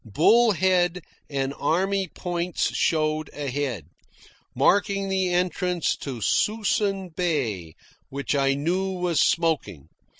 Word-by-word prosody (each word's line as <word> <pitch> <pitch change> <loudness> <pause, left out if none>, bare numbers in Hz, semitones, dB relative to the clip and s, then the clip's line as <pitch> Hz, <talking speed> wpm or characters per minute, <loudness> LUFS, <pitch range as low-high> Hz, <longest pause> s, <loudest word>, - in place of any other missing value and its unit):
Bull 215 - +4
Head 180 -1 +1 0.3
and 135 -1 -2
Army 190 +5 0
Points 175 0 -2
showed 155 -1 0
ahead, 140 - -3 0.7
marking 195 +7 +2
the 190 -1 0
entrance 180 -1 0
to 130 -5 -6
Suisun 205 - 0
Bay 120 - -2 0.3
which 140 +2 -3
I 135 -1 +2
knew 185 +6 -1
was 180 -3 0
smoking. 150 - 0
170 Hz, 105 wpm, -24 LUFS, 140-190 Hz, 0.7 s, Bull